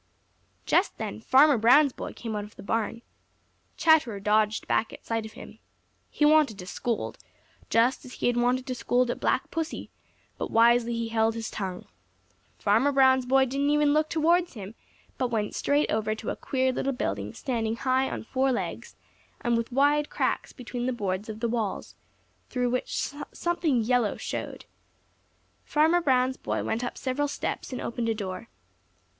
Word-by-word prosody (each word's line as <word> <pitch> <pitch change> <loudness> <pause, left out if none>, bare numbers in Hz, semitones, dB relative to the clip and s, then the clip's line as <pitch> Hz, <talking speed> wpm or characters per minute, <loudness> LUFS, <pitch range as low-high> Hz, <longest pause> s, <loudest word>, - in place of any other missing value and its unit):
Just - - +2
then 105 - -5
Farmer 265 - +5
Brown's 255 +5 +5
boy - - -6
came 225 -2 -5
out 205 - -2
of 210 - -12
the 200 - -11
barn. 225 +2 -2 0.7
Chatterer 300 -11 +3
dodged 210 +1 +1
back 225 - +1
at - - -12
sight 225 -1 -2
of 215 - -15
him. - - -12 0.5
He 295 - +1
wanted 300 -8 +4
to 180 - -8
scold, 230 +5 -3 0.5
just 235 +3 +2
as 255 - -11
he - - -4
had 245 - +2
wanted 245 +2 +1
to 255 - -3
scold 250 0 +1
at - - -5
Black - - 0
Pussy, 325 -1 -4 0.5
but - - -2
he - - -13
wisely 230 0 +3
held 225 0 +1
his 225 -1 -5
tongue. 185 -3 -5 0.7
Farmer 225 +8 +3
Brown's 260 -2 +4
boy 265 +1 +4
didn't 275 +3 0
even 295 0 +3
look 310 0 +2
towards 340 +2 +2
him 205 -3 -8 0.5
but 255 - +1
went 220 -3 -2
straight 290 +1 +1
over 215 0 0
to 220 - -4
a - - -4
queer 260 -1 0
little 270 +2 -1
building 100 - -3
standing 225 -4 -2
high 260 +2 +1
on - - -5
four 265 +3 0
legs 245 - -4 0.5
and 240 0 +1
with 230 +2 -2
wide 290 +3 +2
cracks - - -1
between 245 -1 -5
the 255 - 0
boards 200 -2 -3
of 215 0 -7
the 235 - +1
walls, 225 -4 -3 0.6
through 245 -1 0
which 250 +2 -2 0.2
something 345 -8 0
yellow 235 -1 +1
showed. - - -5 1.0
Farmer 320 +4 +3
Brown's 260 -3 +2
boy - - -3
went 225 +2 -2
up 245 - -4
several 280 +2 -1
steps 285 - -4
and 255 - -4
opened 235 0 -3
a 225 - 0
door. 195 +1 -6
245 Hz, 175 wpm, -27 LUFS, 220-270 Hz, 1.0 s, Farmer